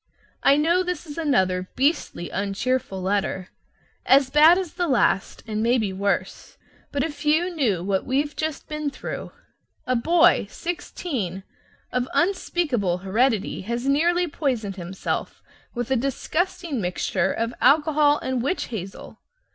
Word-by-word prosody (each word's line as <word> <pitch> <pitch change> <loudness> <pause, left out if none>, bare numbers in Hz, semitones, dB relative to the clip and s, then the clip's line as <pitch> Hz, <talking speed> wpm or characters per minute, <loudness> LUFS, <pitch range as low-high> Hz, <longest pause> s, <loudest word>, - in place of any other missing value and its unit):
I 280 - +5
know 335 +4 +3
this 360 -1 -3
is 295 -3 -8
another 185 - +1
beastly 265 - 0
uncheerful 200 0 -2
letter, 190 -1 -1 0.5
as 270 0 +4
bad 310 +4 +7
as 370 -4 -3
the 350 -1 -1
last, 240 - +1
and 215 -1 -2
maybe 230 -4 +1
worse, 200 +1 -2 0.3
but 280 -1 0
if 295 -1 -5
you 320 +4 +2
knew 220 - 0
what 190 0 0
we've 280 +2 -1
just 315 -2 -3
been 305 -1 -3
through! - - -6 0.5
A 255 - +1
boy 330 +8 +4
sixteen 280 - -4 0.5
of 250 0 -1
unspeakable 305 - +1
heredity 220 +1 +1
has 235 +6 -3
nearly 345 +5 +2
poisoned 245 - -2
himself 185 +1 -4 0.3
with 245 +1 -3
a - - +4
disgusting 290 - -2
mixture 185 +1 0
of 230 +1 -2
alcohol 295 +1 +4
and 260 -2 -1
witch 280 +10 -2
hazel. 195 -4 -7
260 Hz, 135 wpm, -24 LUFS, 200-310 Hz, 0.5 s, bad